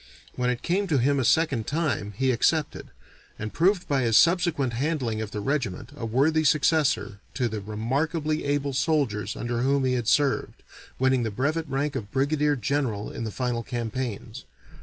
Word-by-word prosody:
When 125 0 0
it 125 -1 -2
came 195 +3 0
to 155 -5 +2
him 140 +3 +2
a - - +1
second 135 -5 +2
time 140 -10 -1
he 130 +1 +2
accepted, 150 +5 0 0.5
and 110 0 -5
proved 180 +1 +2
by 140 -2 +1
his 115 -3 +3
subsequent 170 -7 +3
handling 125 -4 -1
of 110 - -4
the 105 0 -5
regiment 120 -2 -2
a 115 -5 -5
worthy 150 +7 +2
successor 145 -9 +2 0.2
to 125 -3 +1
the 110 -2 -4
remarkably 145 - -1
able 145 -1 -1
soldiers 130 - 0
under 120 0 -3
whom 135 +1 +2
he 130 - +1
had 120 -3 -1
served, 145 +1 +1 0.3
winning 130 -1 +2
the 115 - -1
brevet 145 +8 -1
rank 140 +2 -1
of 100 -2 -5
brigadier 145 +2 +1
general 120 -4 -2
in 115 - -5
the - - -3
final 120 0 -2
campaigns. 120 - -5
130 Hz, 175 wpm, -26 LUFS, 115-150 Hz, 0.5 s, his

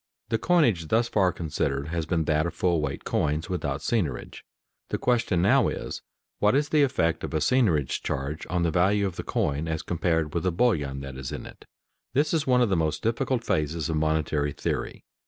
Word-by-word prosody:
_ - - -42
The 115 - +1
coinage 120 - +2
thus 115 +6 +2
far 95 -3 +3
considered 75 -3 -2
has 85 -1 -2
been 80 -2 +1
that 75 +1 +1
of 85 - -6
full 85 -2 +1
weight 70 -2 -3
coins 75 +4 -1
without 75 -5 -2
seigniorage. 80 - -2 0.5
The - - -1
question 115 -8 +1
now - - +4
is, - - -4 0.4
What 105 +4 +3
is 145 +1 +1
the 155 - +3
effect 85 - +1
of - - -4
a - - +4
seigniorage 85 - +2
charge 70 +4 -3
on 90 -1 0
the 85 - +1
value 100 +5 +2
of 95 -3 -3
the - - -5
coin 75 +3 -1
as 80 0 -2
compared 80 -3 0
with 85 - 0
the 90 - +1
bullion 75 - +1
that 70 -1 -7
is 65 -1 -5
in - - -6
it? - - -13 0.5
This 150 +4 +2
is 160 -4 0
one 125 -1 +4
of 115 - +1
the 95 - +2
most 80 -2 -1
difficult 120 +2 0
phases 80 -4 -1
of 80 - 0
monetary 75 -2 0
theory. - - -3
85 Hz, 210 wpm, -26 LUFS, 75-110 Hz, 0.5 s, now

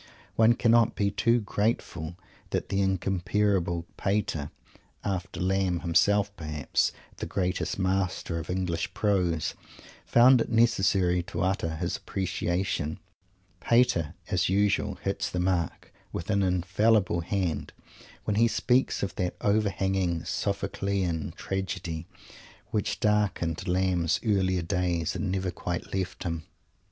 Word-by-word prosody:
One 115 +1 +6
cannot 115 -1 +3
be 100 -1 +1
too 115 +4 +2
grateful 100 -6 -2 0.3
that - - -2
the 100 - +1
incomparable 95 -2 +1
Pater, 95 -8 -1 0.5
after 90 -3 -3
Lamb 95 -1 +1
himself, 100 +4 +2
perhaps, 75 -4 0 0.3
the - - -4
greatest 90 -1 -1
master 95 -3 -1
of 80 - -8
English 90 -2 -2
prose, 90 -7 +1 0.5
found 125 +1 +6
it - - -2
necessary 95 -6 +3
to 85 - -4
utter 95 -4 0
his - - -2
appreciation. 90 -4 -2 0.6
Pater, 105 -10 +2
as 90 -5 +1
usual, 100 +1 +2
hits - - -1
the 90 - -3
mark 90 -2 -1 0.2
with 85 +5 -4
an 100 -1 +2
infallible 95 +1 +2
hand 85 -4 -2 0.5
when 105 -1 -1
he 115 +1 +5
speaks 125 +2 +1
of 100 - -2
that 90 -1 -1
overhanging 95 -4 +1
Sophoclean 95 -5 -1
tragedy 95 -4 -4 0.6
which 105 - -1
darkened 100 -5 +1
Lamb's 90 -2 +1
earlier 95 -4 +2
days 85 -2 0
and 100 -3 -2
never 95 -1 -1
quite 90 0 -4
left 95 -2 -3
him. 85 -3 -3
95 Hz, 120 wpm, -28 LUFS, 85-100 Hz, 0.6 s, One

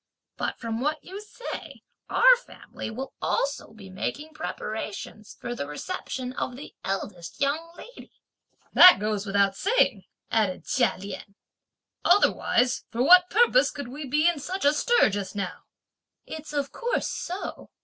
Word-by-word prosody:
but - - -3
from 230 -1 -4
what 300 +1 -1
you 385 +3 -8
say, 425 +3 -8 0.3
our - - +7
family 485 - -9
will 260 +5 -6
also 280 +1 -1
be 215 -3 -13
making 290 +11 -5
preparations 215 -7 -6
for 240 - -4
the 145 -12 -5
reception 255 - -5
of 250 -1 -3
the 280 - -10
eldest 190 -3 -5
young 310 +4 -1
lady!" - - -12 0.6
"That 365 - +10
goes 210 0 -2
without 200 0 +2
saying," 445 - +1 0.3
added 205 -5 0
Chia 250 -3 +2
Lien, 200 +1 -8 0.7
"otherwise, 250 -10 +3
for 235 +2 -1
what 360 +4 +7
purpose 485 +3 +4
could 285 -4 -7
we 290 +4 -7
be 300 +5 +2
in 345 -4 +2
such 370 +4 -4
a 290 - +5
stir 475 - +3
just 195 -1 -4
now?" 195 -3 -5 0.6
"It's 315 0 -8
of 285 -2 -2
course 480 +1 -1
so!" 365 +3 -5
270 Hz, 150 wpm, -26 LUFS, 210-345 Hz, 0.7 s, That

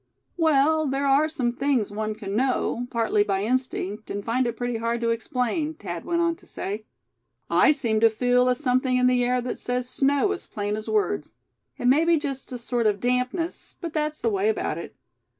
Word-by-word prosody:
"Well, 315 -1 +3
there 275 +1 -1
are 280 +3 +4
some 260 -7 -1
things 250 -4 0
one 215 +1 -3
can 205 -2 -5
know, 245 -1 0
partly 225 -3 +2
by 195 -1 -1
instinct, 220 -3 -2
and 200 0 -4
find 245 +2 +1
it 235 -1 -4
pretty 245 -1 -2
hard 230 +1 -1
to 230 0 +1
explain," 250 +7 -1
Thad 175 - -6
went 340 0 0
on 335 0 +1
to - - -21
say. 210 +2 -5 0.7
"I - - +6
seem 235 -7 0
to 230 +1 +6
feel 245 +3 +2
a 250 - +3
something 255 -2 +1
in 250 - +3
the 250 -1 +3
air 250 +1 +1
that 250 - -4
says 250 0 -2
'snow' 280 +9 +2
as 400 - -5
plain 205 -1 -3
as 215 0 -6
words. 425 -2 0 0.4
It - - -5
may 275 +6 +5
be 335 0 +4
just 275 -3 -4
a 250 - -4
sort 235 -1 0
of 205 -1 +1
dampness; 250 - -2
but 335 -3 -5
that's 305 0 -1
the 230 - 0
way 200 +1 +1
about 220 - -1
it. - - -9
250 Hz, 205 wpm, -25 LUFS, 225-280 Hz, 0.7 s, I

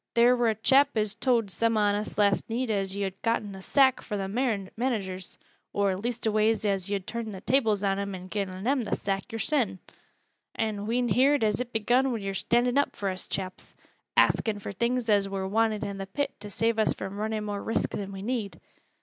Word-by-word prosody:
Theer 240 +1 +6
wur 240 -1 +2
a 220 - +2
chap 270 +4 +4
as 210 -1 +1
towd 230 -3 +1
some 230 +5 +1
on 205 -1 +3
us 210 +1 -3
last 205 0 +2
neet 235 +1 -1
as 195 -2 -1
yo'd 195 -1 -3
getten 225 -3 0
th' 190 - -9
sack 265 +1 +4
fro' 210 - -4
th' 195 -1 -3
managers 210 -4 -2 0.4
or 200 -2 +1
leastways 220 0 0
as 195 -2 0
yo'd 200 -2 -2
turned 230 0 -4
th' 185 - -13
tables 225 -6 +2
on 195 0 +1
'em 200 -1 -3
an' 185 0 -8
gi'en 190 -1 -4
them 260 +1 +1
th' 210 - -1
sack 195 +3 -3
yo'rsen. 225 -2 0 0.8
An' 215 -2 -2
we'n 240 +1 +1
heerd 265 +5 +4
as 215 +2 +1
it 250 -1 -5
begun 245 +4 +2
wi' 235 - -1
yo're 195 -2 -4
standin' 245 +6 +2
up 285 - 0
fur 200 - -2
us 185 - -6
chaps 185 -1 -5 0.4
axin' 220 -2 +3
fur 200 - -6
things 235 +4 -1
as 200 -2 +3
wur 195 -1 -3
wanted 220 +1 +1
i' 200 - -3
th' 195 0 -7
pit 285 - -1
to 205 - -8
save 225 +2 0
us 215 - +3
fro' 190 - -5
runnin' 215 +2 -3
more 205 -1 -3
risk 225 - -1
than 200 -1 -4
we 195 0 -7
need. 210 -7 -3
215 Hz, 210 wpm, -28 LUFS, 195-235 Hz, 0.8 s, Theer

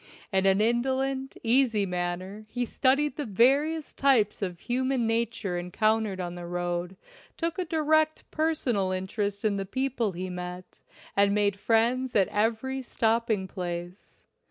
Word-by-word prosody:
In 190 0 +3
an 195 +1 +4
indolent, 265 +3 0
easy 230 -3 +3
manner 180 +3 -4
he 245 +2 -2
studied 275 +4 +1
the 295 - -2
various 280 +9 +2
types 245 -8 +3
of 180 -3 -4
human 255 0 0
nature 225 -5 -1
encountered 215 +2 0
on 175 -1 -3
the 175 -1 -7
road, 175 +1 -3 0.4
took 335 +2 -2
a 365 - 0
direct 315 -1 +2
personal 260 -12 0
interest 200 +2 -2
in 205 -2 +2
the 195 - -1
people 250 -3 -1
he 185 +2 -4
met, 180 0 -7 0.4
and 200 0 +4
made 205 -1 +1
friends 240 +4 +1
at 195 -3 +4
every 230 +5 0
stopping 225 -4 0
place. 175 0 -7
220 Hz, 140 wpm, -27 LUFS, 190-260 Hz, 0.4 s, an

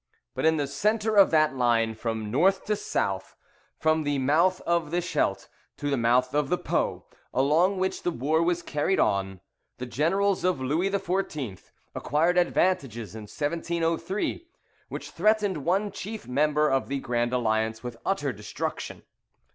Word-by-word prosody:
But - - -2
in 160 0 +3
the 145 - 0
centre 215 +8 0
of 200 -2 +7
that 155 -4 +3
line 115 -3 +2
from 110 -1 -4
north 190 - +2
to 210 - +1
south, 95 - -2 0.4
from 160 0 +2
the 145 -1 0
mouth 160 +8 +3
of 170 -3 0
the 175 +3 0
Scheldt 100 - -1 0.3
to 145 0 -2
the - - +3
mouth 125 +2 +2
of 145 -2 +1
the 180 - +2
Po, - - -1 0.3
along 160 +9 +3
which 190 0 -1
the - - 0
war 155 +2 0
was 175 0 0
carried 155 +5 0
on, 95 -2 0 0.4
the 125 - -5
generals 175 - +1
of 180 -5 +1
Louis 155 +9 0
XIV. 175 - -3 0.2
acquired 170 +5 +2
advantages 135 - 0
in 110 -1 -8
1703, 170 - -2 0.4
which - - -7
threatened 205 -5 +1
one 195 +4 +1
chief 210 +2 -7
member 150 +3 +2
of 135 -2 +1
the 140 +1 -2
Grand 120 -2 -1
Alliance 110 -2 0
with 120 -1 -6
utter 145 -9 -1
destruction. 105 -1 -5
150 Hz, 155 wpm, -27 LUFS, 125-180 Hz, 0.4 s, of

